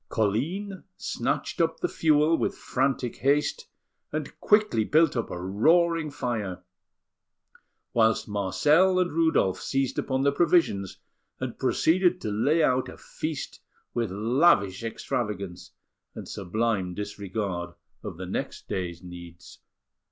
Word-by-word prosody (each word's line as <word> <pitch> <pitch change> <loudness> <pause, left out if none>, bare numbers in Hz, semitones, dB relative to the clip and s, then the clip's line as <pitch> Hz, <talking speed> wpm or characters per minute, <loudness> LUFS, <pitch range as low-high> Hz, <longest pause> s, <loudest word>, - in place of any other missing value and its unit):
Colline 165 - -1
snatched - - -2
up - - 0
the 360 - 0
fuel 155 - +3
with - - -1
frantic 130 -2 -1
haste, 150 - +1 0.4
and - - -4
quickly 210 - +3
built 155 +5 +3
up 115 - -2
a 90 - -5
roaring 160 - +2
fire; 110 -10 -3 1.3
whilst 110 -1 +3
Marcel 150 - +3
and 180 -1 +1
Rudolf 160 - +2
seized 135 -1 -1
upon 130 0 -1
the 140 - +4
provisions, 140 - +2 0.4
and - - -5
proceeded 180 +2 +2
to 105 - -3
lay 145 +10 +2
out 130 -3 +2
a - - -11
feast 155 -3 -6 0.3
with 115 -3 -1
lavish 110 - +2
extravagance, 100 -6 -4 0.5
and - - -8
sublime 100 -1 -1
disregard 100 -3 -4 0.3
of - - -7
the - - -6
next - - -5
day's 85 -2 -4
needs. 85 -1 -11
120 Hz, 120 wpm, -27 LUFS, 100-160 Hz, 1.3 s, the